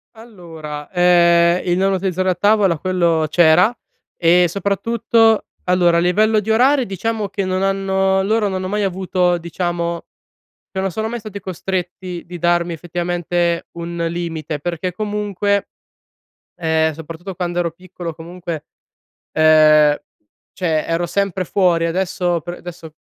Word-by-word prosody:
Allora, 165 -10 -9
ehm, 175 -1 +4
il 175 -1 +1
non 195 +1 +2
utilizzarlo 185 0 0
a - - -1
tavola 205 -4 +3
quello 170 -3 +1
c'era, 175 +5 +5 0.4
e 175 +1 +4
soprattutto 220 +4 +1 0.2
allora 180 -2 +3
a - - +4
livello 215 +5 +3
di 210 +1 -6
orari, 255 +4 +4
diciamo 215 +2 -3
che 195 0 -3
non 185 0 -1
hanno 195 0 +1
loro 215 +2 +1
non 190 - -3
hanno 185 0 -3
mai 205 +2 -1
avuto, 185 -2 0
diciamo 170 0 -3 0.7
che 190 - -4
non 195 0 0
sono 220 +5 -3
mai 240 +1 -4
stati 210 -2 -8
costretti 180 -1 -5
di 175 0 -8
darmi 175 0 +1
effettivamente, 175 0 -2
un 170 0 -6
limite 165 -3 -4
perché 175 +3 -3
comunque 205 0 -1 0.9
ehm, 160 -1 +1
soprattutto 165 +4 -8
quando 175 0 -3
ero 170 -1 -1
piccolo, 175 0 -8
comunque, 170 -1 -7 0.7
ehm, 155 -1 +5 0.6
cioè, 160 -4 -1
ero 165 +1 -1
sempre 190 +1 -1
fuori. 175 -2 +2
Adesso 175 0 -1
pr 175 +3 -6
adesso 170 -2 -10
180 Hz, 140 wpm, -19 LUFS, 170-195 Hz, 0.9 s, c'era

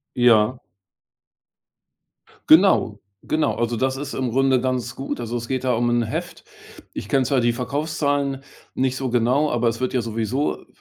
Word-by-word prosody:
Ja. 120 0 +4 1.9
Genau. 160 - +5 0.3
Genau. 155 0 0
Also, 120 0 -1
das 130 +3 0
ist 145 +1 -6
im 130 -2 -2
Grunde 135 +1 +3
ganz 125 -2 -2
gut. 135 -1 -5
Also, 120 0 -4
es 120 0 -5
geht 130 -1 -2
da 125 -1 +2
um 120 +1 +1
'n 120 0 +2
Heft. 110 - -5 0.5
Ich - - -6
kenne 135 -1 +3
zwar 135 -1 +1
die 120 0 +2
Verkaufszahlen 140 +1 -2 0.3
nicht 130 0 0
so 130 -1 -3
genau, 125 +5 +2
aber 120 -1 +1
es 115 +1 -3
wird 130 - -1
ja 130 - +1
sowieso, 115 +5 -2
i - - -22
130 Hz, 170 wpm, -22 LUFS, 120-135 Hz, 1.9 s, Genau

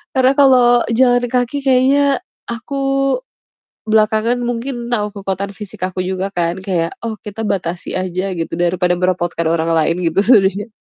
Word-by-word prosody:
Karena 260 0 +4
kalau 245 -3 +5
jalan 245 +1 +3
kaki 250 +3 -1
kayaknya 270 +1 +3 0.3
aku 235 +4 -5 1.1
belakangan 220 +2 +2
mungkin 240 0 -4
tahu 210 -3 0
kekuatan 200 0 -4
fisik 200 -3 -6
aku 185 0 -4
juga 190 +1 -2
kan 170 +1 -1
kayak, 180 -4 -1 0.2
oh 225 - -3
kita 215 +2 -5
batasi 180 -3 -3
aja 185 +1 -2
gitu 165 -1 -4
daripada 175 +1 +1
merepotkan 175 -2 0
orang 165 0 0
lain 165 0 +2
gitu 165 - 0
sebenernya. 205 -2 +3
205 Hz, 145 wpm, -17 LUFS, 180-245 Hz, 1.1 s, kalau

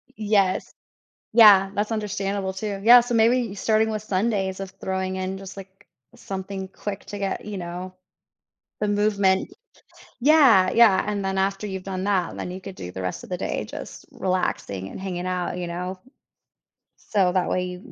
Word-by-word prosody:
Yes. 205 -3 +1 0.6
Yeah. 205 -4 +7
That's 210 +2 -1
understandable 200 -2 -2
too. 200 +1 -4
Yeah. 240 +3 +9
So 240 0 -3
maybe 230 -1 +3
starting 220 +2 +1
with 215 -1 -3
Sundays 195 -2 -1
of 195 -1 -5
throwing 190 0 -3
in 190 +1 -3
just, 195 0 -10
like, 190 -1 -13 0.3
something 190 0 -6
quick 195 +1 -6
to 205 - -6
get, 195 -1 -3
you 205 -2 -5
know, 180 +1 -6 0.9
the 210 - 0
movement. 205 -2 +1 0.7
Yeah. 250 -10 +6
Yeah. 225 -5 +5
And 205 -1 -2
then 190 0 -2
after 195 +2 -1
you've 190 -2 -5
done 190 -1 -4
that, 190 -4 0
then 180 - -5
you 185 +1 -7
could 195 -1 -9
do 90 - -7
the 95 - -6
rest 90 -1 -4
of - - -11
the - - -3
day - - -3
just - - -9
relaxing 140 - -2
and - - -9
hanging 180 -2 -4
out, 180 -1 -2
you 175 - -4
know? 180 +2 -5 1.1
So 190 -4 +4
that 185 -1 0
way 180 0 0
you 180 0 -6
can - - -15
195 Hz, 180 wpm, -24 LUFS, 185-210 Hz, 1.1 s, Yeah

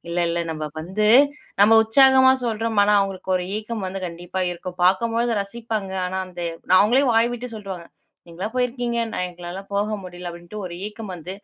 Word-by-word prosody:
இல்ல 170 +1 -2
இல்ல 170 - -1
நம்ப 155 -1 -4
வந்து, 190 +6 -2 0.6
நம்ப 210 +2 +7
உற்சாகமா 260 +3 +6
சொல்றோம். 225 -1 -1
ஆனா 210 +1 +3
அவங்களுக்கு 195 -1 -4
ஒரு 180 - -3
ஏக்கம் 215 -1 -4
வந்து 190 +1 -4
கண்டிப்பா 175 +2 -6
இருக்கும். 180 +1 -7
பார்க்கும்போழுது 230 +4 +2
ரசிப்பாங்க, 215 -2 -4
ஆனா 190 +1 -3
அந்த 175 -1 -9 0.4
அவங்களே 240 +7 +4
வாய் 230 +2 +3
விட்டு 245 +1 -6
சொல்டுருவாங்க. 190 -5 -7 0.4
நீங்களா 180 +5 -5
போயிருக்கீங்க 245 -1 -1
நா - - -3
எங்களால 175 +2 -8
போக 205 +1 +1 0.2
முடியல 180 -1 -7
அப்டின்ட்டு 175 +5 -9
ஒரு 170 - -7
ஏக்கம் 210 -2 -8
வந்து 180 +3 -8
200 Hz, 170 wpm, -22 LUFS, 180-230 Hz, 0.6 s, நம்ப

